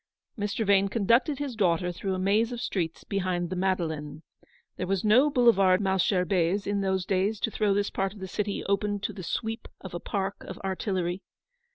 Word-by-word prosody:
Mr. 205 +1 -2
Vane 200 0 +4
conducted 235 - +2
his 280 -4 -4
daughter 180 -3 +1
through 190 +2 -3
a - - -3
maze 205 +5 +2
of 240 - -4
streets 170 -8 -3
behind 180 -3 -2
the - - -1
Madeleine. 160 -5 -2 0.5
There 180 - -4
was 195 -1 0
no 250 +8 +5
Boulevard 200 -8 +4
Malesherbes 190 -1 +1
in 200 0 0
those 190 -2 0
days, 195 +3 0
to 225 - 0
throw 205 -2 +1
this 205 0 0
part 195 0 -1
of - - -12
the 190 - -5
city 205 +1 -2
open 205 +1 0
to - - -3
the 190 - -8
sweep 225 +6 -3
of 190 - -9
a 175 - -3
park 195 +2 -3
of 185 - -8
artillery. 190 -1 -2
195 Hz, 190 wpm, -27 LUFS, 185-210 Hz, 0.5 s, no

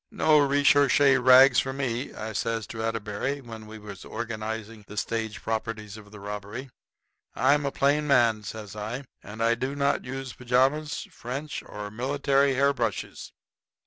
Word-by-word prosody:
"No 155 -1 +4
recherché 140 -1 +4
rags 130 0 +8
for 135 - -2
me," 130 -2 -2
I 110 0 -6
says 115 +1 -1
to 110 +1 -7
Atterbury, 115 +4 -2
when 110 -4 -10
we 110 +1 -9
was 105 -2 -10
organizing 110 -1 -5
the 105 - -10
stage 110 0 -3
properties 110 -2 -3
of 105 -2 -12
the 105 0 -12
robbery. 105 +6 -7 0.6
"I'm 140 +2 +3
a - - -1
plain 145 +2 +1
man," 120 -6 +4
says 105 -1 -8
I, 110 +6 -5 0.2
"and 110 +2 -5
I 115 +1 +4
do 130 +4 -3
not 140 0 +1
use 135 0 -6
pajamas, 130 +5 0
French, 135 +5 -5
or 105 -1 -7
military 140 +3 +1
hair 140 +2 +3
brushes. 115 -6 -3
120 Hz, 155 wpm, -27 LUFS, 110-140 Hz, 0.6 s, rags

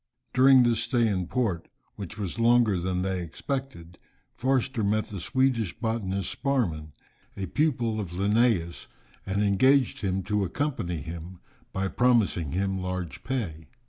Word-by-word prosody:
During 130 0 +7
this 120 -2 +2
stay 120 0 +2
in 95 -4 -1
port, 95 -7 -1 0.3
which 100 0 -7
was 100 +1 -4
longer 115 -4 +4
than 90 +1 -1
they 95 -1 -1
expected, 90 - -5 0.3
Forster 130 -2 0
met 105 +2 0
the 100 - -6
Swedish 120 -2 0
botanist 105 -5 -2
Sparman, 90 - -1 0.5
a 95 - -2
pupil 120 - 0
of 100 -5 -4
Linnæus, 100 -1 +1 0.4
and 100 +2 0
engaged 130 +7 +3
him 95 -2 -1
to 105 +1 0
accompany 95 - -2
him, 85 +4 -8 0.3
by 95 0 -1
promising 105 - +2
him 95 +1 -1
large 90 -2 -4
pay. 95 -12 -4
100 Hz, 140 wpm, -27 LUFS, 90-120 Hz, 0.5 s, During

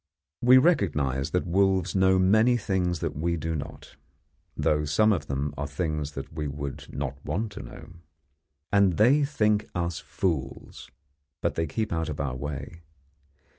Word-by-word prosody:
We 125 +2 +7
recognise 75 - +2
that 90 - 0
wolves 95 0 +2
know 95 0 +4
many 110 +6 +4
things 90 -5 -1
that - - -2
we 85 +3 -1
do 80 +1 -3
not; 70 -2 -8 0.6
though 75 0 +1
some 105 +9 +3
of 80 -6 -3
them 70 +2 -2
are 70 - -3
things 75 -3 -3
that 70 +3 -7
we 75 -2 -3
would 70 -1 -6
not 70 0 -5
want 105 +9 -2
to - - -8
know. - - -11 0.8
And 100 -2 +4
they 130 +8 +5
think 105 -7 +1
us 85 -1 -2
fools 75 -8 -4 0.5
but - - -1
they 80 0 -1
keep 110 +6 -2
out 80 -1 -1
of 75 - -5
our 70 -2 -2
way. 70 +4 -6
85 Hz, 160 wpm, -27 LUFS, 70-100 Hz, 0.8 s, We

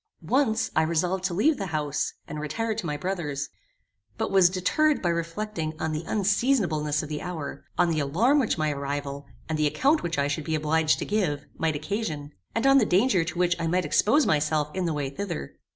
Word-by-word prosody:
Once 245 -5 +2
I 160 - +5
resolved 175 +3 0
to 180 -3 -1
leave 285 - +3
the 195 - -2
house, 150 -3 -1
and 150 - -5
retire 220 +10 -2
to 215 -4 -4
my 150 -1 -2
brother's, 150 -6 -3 0.7
but - - -2
was 190 -2 +6
deterred 275 +12 +2
by 175 - 0
reflecting 170 -1 -3
on 160 - -1
the 155 +1 -3
unseasonableness 195 - +1
of 150 - -7
the 150 -1 -4
hour, 165 -5 -6
on 175 -1 +3
the 155 - 0
alarm 200 - +3
which 240 -9 +1
my 155 -1 +1
arrival, 140 0 -4 0.2
and 155 -1 -2
the 150 - +3
account 270 - +2
which 170 -2 -3
I 140 0 +2
should 145 +2 -2
be 160 - 0
obliged 155 +1 +2
to - - -4
give, 175 -9 -1
might 160 -2 0
occasion, 155 -3 -3 0.2
and 230 - 0
on 275 0 +7
the 230 - +3
danger 195 -1 +3
to 170 +1 -5
which 175 -1 +2
I 165 - -1
might 180 +2 +1
expose 275 +8 +3
myself 150 0 +1
in 185 -1 -1
the 165 - 0
way 140 -2 -2
thither. 170 +2 -5
165 Hz, 210 wpm, -26 LUFS, 150-200 Hz, 0.7 s, on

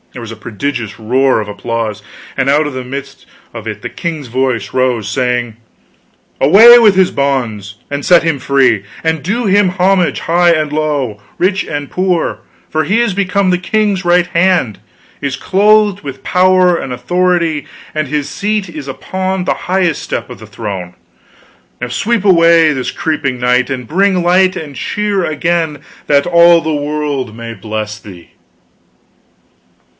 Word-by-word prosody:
There 125 - -8
was 115 -1 -8
a - - -7
prodigious 110 -1 -5
roar 130 +3 +2
of 105 - -4
applause, 110 0 -4 0.3
and 135 - 0
out 150 +2 +3
of 145 - -6
the 130 0 -5
midst 135 +2 -8 0.3
of 115 -2 -8
it 105 -1 -5
the - - -2
king's 160 -5 -5
voice 120 -4 -2
rose, 125 -5 0
saying: 120 0 -1 0.9
"Away 220 - +8
with 215 -4 +5
his 190 -1 +3
bonds, 115 -7 -2
and 140 0 -4
set 175 -2 +5
him 165 -3 0
free! 130 -7 +2 0.2
and 160 -2 0
do 230 +7 -1
him 200 -1 +3
homage, 185 0 +1
high 175 +1 +2
and 155 -3 0
low, 145 -9 -2 0.2
rich 190 +2 +1
and 145 -2 -5
poor, 180 -2 -1 0.3
for 155 0 -1
he 205 +7 +1
is 235 -4 +1
become 195 0 0
the 180 - +2
king's 205 0 0
right 175 0 +3
hand, 170 - +1 0.4
is 140 -2 -3
clothed 205 0 +3
with 140 -2 -8
power 185 -1 +3
and 135 - -5
authority, 170 +2 0 0.3
and 155 -1 -1
his 145 +1 -2
seat 210 -1 -2
is 155 -5 -8
upon 185 +5 -3
the - - +1 0.2
highest 180 -4 +1
step - - -4
of - - -10
the - - -12
throne! 95 -5 -6 0.8
Now 125 - -3
sweep 205 - -1
away 165 -4 +5
this 130 -2 -3
creeping 145 -5 -2
night, 125 +1 +1
and 125 -3 -4
bring 195 - +2
the - - +1
light 185 +2 +3
and 150 -4 -7
cheer 205 +2 -2
again, 165 -1 -1 0.3
that 140 -1 +3
all 170 0 +6
the 160 -1 -2
world 145 -4 -3
may 115 0 -7
bless 110 -1 -5
thee." 95 -6 -13
150 Hz, 165 wpm, -14 LUFS, 125-180 Hz, 0.9 s, Away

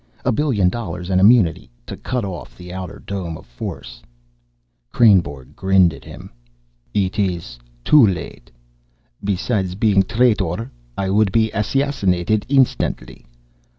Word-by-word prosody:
"A - - +3
billion 110 -8 +1
dollars 90 -4 -5
and 95 0 +3
immunity 100 - +4 0.2
to - - -7
cut 125 -4 -3
off 95 -3 -8
the 90 0 -10
outer 90 -3 -7
dome 90 -5 -5
of - - -15
force." - - -8 0.9
Kreynborg 75 - +2
grinned 95 -3 +3
at - - -12
him. - - -11 0.6
"It 100 - -1
is 85 -11 -2 0.3
too 145 -7 +6
late. 85 -9 -5 0.7
Besides 95 -1 -1
being 105 -1 +2
a - - +5
traitor, 110 -2 0 0.3
I 95 -1 -1
would 105 -1 +2
be 110 +1 +2
assassinated 105 -4 0
instantly. 135 -2 0
95 Hz, 130 wpm, -20 LUFS, 90-110 Hz, 0.9 s, too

